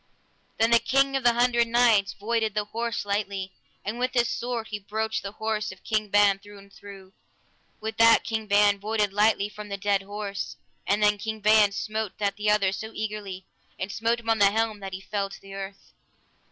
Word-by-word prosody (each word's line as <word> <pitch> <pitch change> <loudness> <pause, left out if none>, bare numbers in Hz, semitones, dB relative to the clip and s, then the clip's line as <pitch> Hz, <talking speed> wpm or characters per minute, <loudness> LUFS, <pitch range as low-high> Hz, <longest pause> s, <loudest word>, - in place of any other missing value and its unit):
Then 225 +1 +3
the 235 - +7
King 275 +2 +2
of 270 - -1
the 240 -1 +5
Hundred 235 0 +3
Knights 230 -4 +3
voided 220 0 -1
the 210 -1 0
horse 230 0 -3
lightly, 200 -2 -2 0.3
and 220 +4 -3
with 255 +1 -1
his 240 -1 +3
sword 240 -2 -3
he 210 - -4
broached 220 +2 -2
the 200 0 -7
horse 220 -2 -2
of 190 - -14
King 215 -2 -1
Ban 205 -1 +4
through 205 +1 -14
and 200 0 -16
through. 195 -1 -13 0.7
With 220 +1 -5
that 230 0 +6
King 220 -1 -3
Ban 205 0 +4
voided 210 -1 -1
lightly 210 0 +3
from 210 0 -10
the 200 - -3
dead 200 -1 +1
horse, 200 0 -5 0.3
and 205 +1 +2
then 210 0 +3
King 220 +1 -4
Ban 210 -1 +5
smote 215 0 -3
at 200 -1 0
the 210 0 -1
other 205 -2 +3
so 220 +3 -6
eagerly, 205 -3 -5 0.3
and 190 +2 -4
smote 230 +3 0
him 230 0 -7
on 225 - +1
the 200 -1 +6
helm 220 0 -1
that 195 -1 -7
he 190 - -6
fell 200 0 -3
to - - -11
the 195 0 -12
earth. 195 0 -8
210 Hz, 205 wpm, -26 LUFS, 200-225 Hz, 0.7 s, the